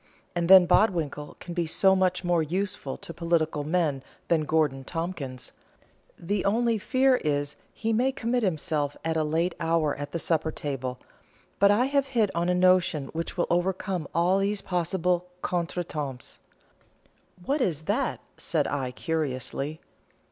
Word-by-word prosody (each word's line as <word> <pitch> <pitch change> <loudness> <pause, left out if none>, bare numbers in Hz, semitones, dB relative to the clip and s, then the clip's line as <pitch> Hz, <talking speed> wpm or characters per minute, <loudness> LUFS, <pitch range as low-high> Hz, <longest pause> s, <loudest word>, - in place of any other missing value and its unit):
And 170 0 0
then 190 -1 +10
Bodwinkle 170 -6 +1
can 175 - -7
be 170 -2 -1
so 190 +4 +4
much 185 0 +1
more 175 -2 +2
useful 175 -3 -2
to 170 - -8
political 165 -3 0
men 155 -3 0 0.3
than 160 -2 +2
Gorgon 150 -4 +1
Tompkins; 155 -5 -5 0.7
the 195 +3 -2
only 230 +2 +2
fear 260 +4 +3
is 145 -4 -1
that - - -30
he 225 0 -2
may 250 +4 +2
commit 245 -1 -1
himself 155 -6 -1
at 165 0 0
a 160 - +2
late 165 +3 0
hour 165 -2 +1
at 145 0 -6
the - - -2
supper 160 -1 0
table, 130 -5 -4 0.6
but 200 - +6
I 210 +5 +4
have 275 0 +1
hit 230 -7 +1
on 170 +1 0
a 180 - +2
notion 180 -6 +3
which 165 +3 -5
will 175 - +2
overcome 180 -1 -1
all 180 +3 +2
these 200 +1 0
possible 180 0 0 0.2
contretemps." 165 -7 -3 1.1
"What 285 +1 0
is 160 - 0
that?" 235 - -1 0.2
said 155 -4 0
I, 135 -3 -2
curiously. 145 0 -3
170 Hz, 155 wpm, -27 LUFS, 155-190 Hz, 1.1 s, then